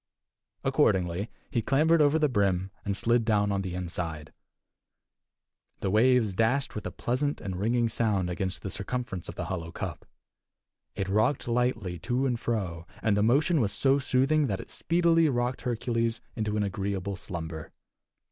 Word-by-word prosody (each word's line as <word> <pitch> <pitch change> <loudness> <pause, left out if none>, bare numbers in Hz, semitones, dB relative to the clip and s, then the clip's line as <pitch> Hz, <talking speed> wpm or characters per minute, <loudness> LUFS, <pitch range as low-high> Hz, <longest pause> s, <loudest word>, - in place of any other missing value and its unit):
Accordingly, 90 +3 +2 0.2
he 120 -5 +1
clambered 155 +7 +3
over 145 +1 +4
the 155 -1 +3
brim, 100 -6 +1
and 100 -1 -2
slid 115 +2 +2
down 105 -2 +2
on 100 -1 0
the 95 -2 -4
inside. 85 -4 -4 1.5
The 95 - 0
waves 115 -1 +4
dashed 115 +8 +1
with 105 - -4
a - - -5
pleasant 145 +4 -1
and 95 -2 -5
ringing 115 +3 +2
sound 105 -5 0
against 95 +1 -3
the 95 - -4
circumference 105 -3 -4
of - - -7
the - - -4
hollow 85 -3 -4
cup; - - -6 0.9
it 95 -1 -2
rocked 110 +8 +1
lightly 115 -7 0
to 125 +9 0
and 120 -3 0
fro, 90 -9 -3 0.2
and 105 -3 +3
the 105 - +2
motion 140 - +3
was 100 -3 +1
so 135 +5 +3
soothing 135 +3 +2
that 95 -5 -2
it - - -9
speedily 165 -1 +3
rocked 125 0 -1
Hercules 115 -1 -1 0.2
into 105 -1 -1
an 105 - +1
agreeable 100 0 -2
slumber. 80 -4 -6
110 Hz, 160 wpm, -28 LUFS, 95-125 Hz, 1.5 s, over